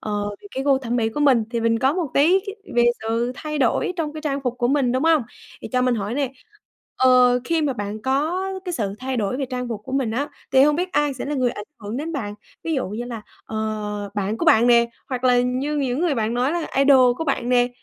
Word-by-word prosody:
ờ, 205 -1 -2
thì - - -11
cái 265 - -2
gu 275 -2 +4
thẩm 245 -2 -2
mỹ 225 -2 +1
của 295 +7 -4
mình 260 -6 +4
thì 235 -1 -1
mình 230 0 +2
có 265 +4 +2
một 340 -6 -2
tí 345 +7 +5
cái 400 - -5 0.2
về 240 0 +4 0.2
sự 230 +2 -1
thay 305 0 -5
đổi 265 +7 +1
trong 310 -3 -2
cái 310 - -7
trang 280 -2 -2
phục 250 -1 -1
của 240 - +1
mình, 265 -3 +2
đúng 260 +4 0
hông? 320 -4 +4 0.4
Thì - - -6
cho 250 0 +2
mình 250 -1 +2
hỏi 210 0 -3
nè, 270 -2 -1 0.6
ờ, 250 -1 +5
khi 325 +3 0
mà 285 - +1
bạn 210 -2 -5
có 300 +8 0 0.2
cái 360 - -3
sự 205 - -2
thay 260 0 -3
đổi 215 +1 -1
về 275 - -2
trang 250 -1 -3
phục 225 -3 -4
của 260 - -8
mình 270 -4 0
á, 270 +6 -2 0.2
thì 265 0 +6
hông 295 +1 +4
biết 365 +2 -2
ai 295 -3 +1
sẽ 255 - -5
là 295 +1 -3
người 255 -2 +1
ảnh 210 - -7 0.2
hưởng 210 +2 -5
đến 315 +5 -4
bạn? 210 -8 -4 0.3
Ví 325 - -1
dụ 260 -8 -1
như 220 +5 -4
là, 235 -3 -6 0.2
ờ, 220 - -7 0.6
bạn 205 +2 -2
của - - -1
bạn 225 +2 +5
nè, 235 -1 +4 0.2
hoặc 255 -1 -4
là 245 -1 +5
như 260 +4 -1
những 265 -1 -1
người 340 -4 +1
bạn 225 -1 -1
nói 255 +4 +1
là 340 -1 -2
idol 265 -3 +5
của 325 - -3
bạn 265 -4 -1
nè, 245 -1 +3
255 Hz, 265 wpm, -22 LUFS, 235-290 Hz, 0.6 s, thì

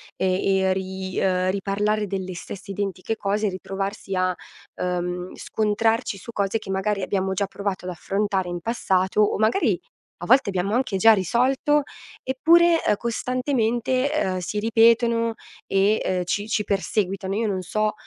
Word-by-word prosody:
e 190 -1 +1 0.3
e 190 0 +2
ri 190 0 -5
uhm, 185 -1 +1
riparlare 205 +2 0
delle 190 -2 -4
stesse 195 +3 -9
identiche 195 +1 -3
cose, 210 0 0
ritrovarsi 195 +1 -5
a, 185 0 +1 0.5
uhm, 180 0 -2
scontrarci 220 +1 0
su 235 - -9
cose 200 0 -1
che 195 - -11
magari 195 +1 -1
abbiamo 190 0 -1
già 195 +1 -1
provato 200 -2 -4
ad 180 - -3
affrontare 195 +1 -1
in 175 0 -4
passato, 190 -2 +1
o 210 - +2
magari 220 - +2 0.4
a - - -6
volte 260 -3 +5
abbiamo 190 +1 -1
anche 240 -4 0
già 225 +4 +6
risolto 255 - +2 0.4
eppure, 330 +5 +4
ehm, - - +3
costantemente, 250 +2 0
ehm, 190 -12 0
si 180 +4 -3
ripetono 230 +1 +3 0.3
e, 195 +2 +2
uhm, 185 -1 0
ci 205 +4 -2
ci 215 -1 0
perseguitano. 195 -1 -1
Io 225 +1 0
non 190 -2 -1
so 215 +3 -1
200 Hz, 155 wpm, -23 LUFS, 190-225 Hz, 0.5 s, già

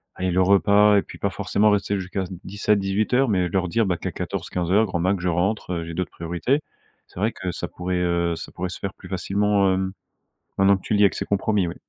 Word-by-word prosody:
allez, 95 0 -1
le 95 +2 +2
repas 100 +2 +5
et - - +4
puis - - -12
pas - - 0
forcément 105 +1 +2
rester 100 0 0
jusqu'à 95 +1 -3 0.2
17:00-18:00, 105 +5 +1
mais 90 -4 +1
leur 90 +1 0
dire, 115 +4 +1
bah, 90 -2 0
qu'à - - -4
14:00-15:00, 90 +5 0
grand 90 -4 -3
maximum 95 +1 +1
je 90 - +1
rentre, 90 +2 -1
heu, 85 -1 -2
j'ai 85 - -7
d'autres 90 0 -3
priorités. 90 - -1 0.5
C'est - - -12
vrai 110 +3 +1
que 95 - -5
ça 80 - -5
pourrait, 90 0 -3
heu, 85 -1 0
ça 80 - -8
pourrait 90 0 -4
se - - -6
faire 95 - -4
plus - - -14
facilement, 100 +1 +1
hem, 95 0 -1 0.7
maintenant 100 0 +5
que - - -14
tu - - -2
le 105 - +3
dis - - +6
avec 100 - +2
ces - - -3
compromis, 100 -1 +1
ouais. 85 - -5
95 Hz, 230 wpm, -23 LUFS, 90-105 Hz, 0.7 s, dis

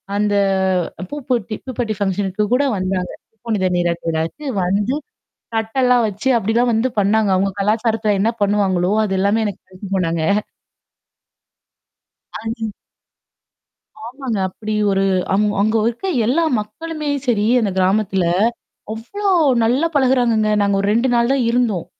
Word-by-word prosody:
அந்த 205 0 +1 0.8
ப்யுபெர்ட்டி, 245 -3 -3
ஃபங்ஷனுக்கு 195 +1 -1
கூட 270 +3 +3
வந்தாங்க. 185 -1 -2 0.2
பூப்புணித 215 -4 -2
நீராட்டு 170 -1 -1
விழாவுக்கு 165 - -3 0.2
வந்து. 205 +8 0 0.6
தட்டெல்லாம் 245 +2 +2
வச்சு 210 +6 -4
அப்டிலாம் 230 +3 +1
வந்து 225 +4 +1
பண்ணாங்க. 205 +1 +2
அவங்க 195 +1 +1
கலாச்சாரத்துல 220 0 +1
என்ன 215 +4 +2
பண்ணுவாங்களோ, 195 -3 +1
அது 195 -2 -2
எல்லாமே 205 +3 +2
எனக்கு 205 -3 -5
வச்சு 185 +2 -9
போனாங்க. 170 -3 0 2.1
ஆ. - - -4 0.2
நீ 225 -1 -3 1.4
ஆமாங்க. 250 -3 -4
அப்படி 215 +3 -6 0.2
ஒரு 195 0 +1 0.3
அங் 210 - +3 0.2
அங்க 215 +2 +2
இருக்க 240 +11 -5 0.2
எல்லா 305 +8 +2 0.2
மக்களுமே 305 +7 -6 0.2
சரி 220 -4 +2 0.2
அந்த 215 -3 0
கிராமத்துல. 190 0 +1 0.7
அவ்ளோ 240 - -5 0.4
நல்லா 255 +8 +2
பழகுறாங்கங்க. 245 -5 +2
நாங்க 200 0 +1
ஒரு 200 - 0
2 235 +4 +2
நாள் 235 +1 +2
தான் 275 -2 +1
இருந்தோம். 235 -8 0
215 Hz, 125 wpm, -19 LUFS, 195-240 Hz, 2.1 s, கூட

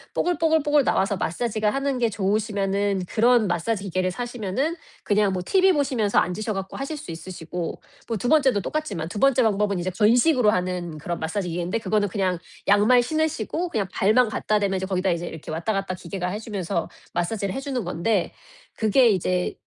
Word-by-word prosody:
뽀글뽀글뽀글 320 -4 +2
나와서 195 -4 +1
마사지가 215 +4 -1
하는 275 +2 -1
게 235 -2 +2
좋으시면은 200 -1 0
그런 235 +2 +3
마사지 195 +3 -1
기계를 185 -1 -1
사시면은 245 - -2 0.3
그냥 205 -1 +2
뭐 180 -1 -2
TV 380 0 +4
보시면서 255 - 0
앉으셔 210 +4 +1
갖고 195 0 -5
하실 275 +3 -4
수 295 - -8
있으시고. 170 0 -6 0.3
뭐 230 - -2
2번째도 260 -2 +3
똑같지만 200 - -3
2번째 255 +7 +3
방법은 205 -2 +1
이제 180 +1 -2
건식으로 240 - +4
하는 180 -4 -1
그런 170 +3 -4
마사지 180 +3 -2
기계인데 175 +5 -2
그거는 210 -1 0
그냥 185 -3 -1 0.3
양말 215 +5 +5
신으시고 315 - -1
그냥 210 - -1
발만 220 +4 +3
갖다 215 0 0
대면 200 -2 0
이제 190 0 -3
거기다 190 -1 0
이제 170 0 -2
이렇게 160 -1 -8
왔다 165 +7 -1
갔다 195 -2 -2
기계가 180 +1 -5
해주면서 200 -4 -3 0.2
마사지를 195 +2 -1
해주는 270 -2 -3
건데 180 +2 0 0.4
그게 230 +3 +4
이제 180 -1 0
205 Hz, 420 characters per minute, -24 LUFS, 185-245 Hz, 0.4 s, 양말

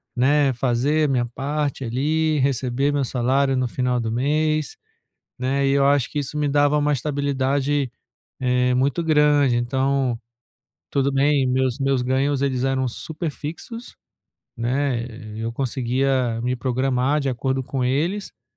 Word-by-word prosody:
né, 135 +2 +3
fazer 135 +5 +1
minha 125 -3 +1
parte 140 +3 -3
ali, 150 +5 0
receber 135 +1 0
meu 140 -1 +1
salário 130 +2 +1
no 130 -1 +1
final 125 0 -1
do 110 -1 -2
mês, 150 +4 0 0.6
né, 135 +2 0
e 135 - +2
eu 140 0 +3
acho 140 -3 +2
que 150 - -3
isso 145 +1 -4
me 145 -1 +1
dava 145 +1 +3
uma 150 0 +1
estabilidade, 140 -1 0 0.5
eh, 125 0 +2
muito 140 +6 +1
grande, 150 -4 +3
então, 130 0 0 0.7
tudo 140 0 +1
bem, 140 0 +3
meus 130 0 0
meus 135 -2 +1
ganhos 135 +2 +1
eles 130 -2 0
eram 135 -1 +1
super 160 +6 -5
fixos, 200 - -8 0.6
né, 125 0 0 0.3
eu 115 +1 -3
conseguia 130 -1 0
me 125 +1 0
programar 130 +3 0
de 140 - -1
acordo 130 +1 -1
com 130 0 -3
eles, 165 +11 0
eh. 115 - -43
135 Hz, 145 wpm, -22 LUFS, 125-145 Hz, 0.7 s, né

